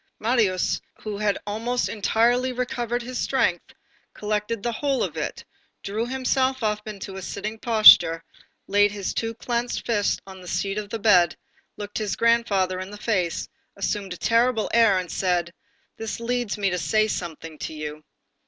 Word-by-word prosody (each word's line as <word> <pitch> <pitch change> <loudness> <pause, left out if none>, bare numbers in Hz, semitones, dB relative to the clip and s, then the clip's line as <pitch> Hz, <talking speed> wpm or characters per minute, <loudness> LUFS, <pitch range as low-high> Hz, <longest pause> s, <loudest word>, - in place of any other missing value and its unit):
Marius, 215 -5 +1 0.2
who 210 -2 -4
had 210 -1 +1
almost 230 +4 -1
entirely 240 +4 +2
recovered 245 -1 -2
his 250 +1 -5
strength, - - 0 0.4
collected 210 +1 -2
the 240 - 0
whole 275 +2 0
of - - -3
it, - - -4 0.4
drew 215 +4 -2
himself 260 0 0
up 210 0 -1
into 195 -2 -7
a - - -6
sitting 210 +4 -5
posture, 215 -8 +7 0.4
laid 205 +1 +3
his 200 -2 -3
two 225 0 -2
clenched 240 +1 -2
fists 210 -4 +1
on 190 -1 -11
the 180 - -12
sheets 200 +3 -1
of 205 -1 -12
his 225 - -4
bed, 180 -8 +4 0.4
looked 205 0 -5
his 210 -2 -2
grandfather 205 -6 +2
in 185 +1 -6
the 210 - -9
face, 190 -6 -1 0.3
assumed 200 0 -2
a 180 - -5
terrible 230 +1 +2
air, 225 -5 +5
and 180 -2 -3
said: 175 -2 0 0.4
"This 225 0 -5
leads 240 -2 -2
me 200 -2 0
to 180 - -1
say 215 +7 +2
something 165 -5 -5
to - - -5
you." 150 0 -6
210 Hz, 165 wpm, -24 LUFS, 190-235 Hz, 0.4 s, posture